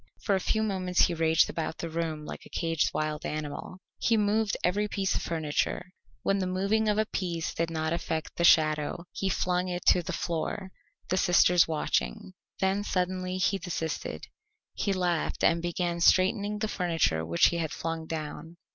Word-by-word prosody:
For 200 - +1
a 190 - +3
few 220 +3 0
moments 185 -4 +1
he 175 - +4
raged 160 -1 +3
about 160 -1 -4
the 170 - -4
room 160 -2 -3
like - - -8
a - - -14
caged 165 -2 0
wild 155 0 -2
animal. 155 +3 -5 0.2
He 230 - +2
moved 210 -1 +1
every 205 +4 +1
piece 195 -1 -1
of - - -1
furniture; 165 +3 -2 0.3
when 195 0 +2
the 185 - -1
moving 200 +4 +1
of 210 - +1
a 215 - +2
piece 175 -5 -3
did 165 0 -1
not 160 0 -1
affect 160 -2 -3
the 170 - -1
shadow, 155 0 +3
he 195 - -2
flung 180 0 0
it 180 0 -4
to 180 - +4
the 170 - -5
floor, 180 +3 -3 0.4
the 185 - +1
sisters 180 -1 +5
watching. 155 - -1 0.3
Then 195 +1 +1
suddenly 185 -1 -1
he 195 +1 +1
desisted. 165 -3 -4 0.5
He 200 - -1
laughed 180 -3 -1
and 165 0 +4
began 175 0 -2
straightening 200 +4 +3
the 215 +1 -1
furniture 165 - 0
which 85 +1 +4
he 170 - -2
had 160 -2 -2
flung 165 -1 -4
down. 160 +1 -6
175 Hz, 180 wpm, -28 LUFS, 160-190 Hz, 0.5 s, sisters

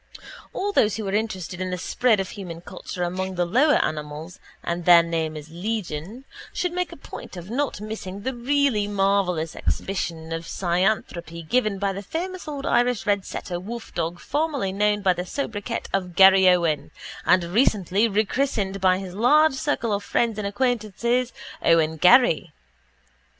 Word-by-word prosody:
All 410 +2 -2
those 215 - +3
who 215 -3 -4
are 195 - -2
interested 190 -5 -2
in 185 - -2
the 180 - -2
spread 225 +4 +1
of 195 - -2
human 175 -5 -8
culture 180 0 -6
among 185 +2 -3
the 175 0 +1
lower 265 - +4
animals 150 +3 -6 0.2
(and 170 0 -3
their 175 -1 +8
name 160 -2 -2
is 155 +1 -10
legion) 200 - -4 0.3
should 360 - -2
make 360 0 -2
a - - -10
point 235 - -10
of 175 +4 -8
not 280 -1 -1
missing 205 -2 -6
the 260 - -2
really 250 -3 +1
marvellous 195 -5 0
exhibition 165 -4 -3
of 165 0 -5
cynanthropy 175 -3 -1
given 215 -2 +1
by 195 0 -1
the 195 - -5
famous 355 - -5
old 285 -2 -5
Irish 245 -1 +1
red 200 -2 +1
setter 175 -1 -5
wolfdog 180 -5 -5
formerly 285 -8 -1
known 205 +1 +1
by 185 -2 +4
the 180 0 -4
sobriquet 205 -1 -4
of 180 -3 -2
Garryowen 180 -6 +5 0.3
and 185 0 +4
recently 200 +1 +2
rechristened 210 -2 -1
by 185 -1 +4
his 190 -2 -7
large 290 +9 +4
circle 265 -5 -1
of 200 0 -2
friends 225 -1 0
and 205 - -2
acquaintances 240 +2 0 0.3
Owen 160 -1 +3
Garry. 180 - +5
195 Hz, 160 wpm, -24 LUFS, 175-235 Hz, 0.3 s, their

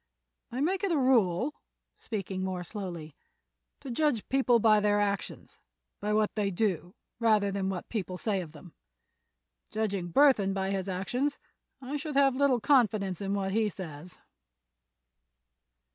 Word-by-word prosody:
I 250 +3 -3
make 370 +6 0
it 395 - +1
a 325 - +2
rule," 250 - +2 0.5
speaking 195 -3 -4
more 185 -1 -3
slowly, 175 -6 -7 0.7
"to 265 - -6
judge 265 -4 0
people 260 -3 +4
by 215 -1 +5
their 205 0 +2
actions; 200 -1 -3 0.4
by 210 - -2
what 215 0 +2
they 205 -2 0
do, 185 -2 -1 0.2
rather 215 -3 +3
than 195 -1 -1
by 190 - -2
what 180 - -8
people 185 -5 -3
say 200 -1 -1
of 165 -4 -9
them. 160 +1 -14 1.0
Judging 200 -5 -2
Burthon 215 - +4
by 190 0 -1
his 195 -1 -2
actions 245 +10 -1 0.5
I 275 +4 -3
should 300 0 -5
have 275 -2 +4
little 270 -2 +3
confidence 215 - +2
in 200 0 -1
what 195 -1 -1
he 215 +1 +1
says." 175 -2 -9
205 Hz, 150 wpm, -29 LUFS, 190-250 Hz, 1.0 s, by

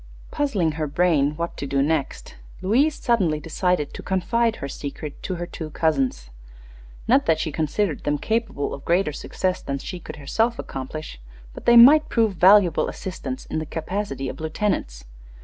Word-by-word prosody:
Puzzling 215 - 0
her 155 -1 -1
brain 150 -2 +2
what 170 0 -3
to 140 - -4
do 135 0 +1
next, 150 -2 -2 0.3
Louise 270 +11 +3
suddenly 185 -11 +1
decided 165 -1 -1
to - - -7
confide 225 +5 0
her 140 - -6
secret 145 +1 -7
to 185 - -3
her 175 0 -4
two 160 -2 -7
cousins. 135 - -1 0.8
Not 265 +4 +3
that 160 - +4
she 160 - -2
considered 160 +3 -1
them 145 0 0
capable 220 -7 -2
of 140 - -7
a - - -20
greater 170 -3 +1
success 185 +5 -2
than 140 - -3
she 180 +6 -7
could - - -9
herself 225 - 0
accomplish, 135 - -7 0.3
but - - -11
they 240 0 +7
might 290 +6 +8
prove 225 -3 +2
valuable 185 -2 +5
assistants 225 +8 -6
in - - -3
the 155 - -4
capacity 160 -4 -4
of 130 - -6
lieutenants. 155 - -2
170 Hz, 170 wpm, -23 LUFS, 145-210 Hz, 0.8 s, might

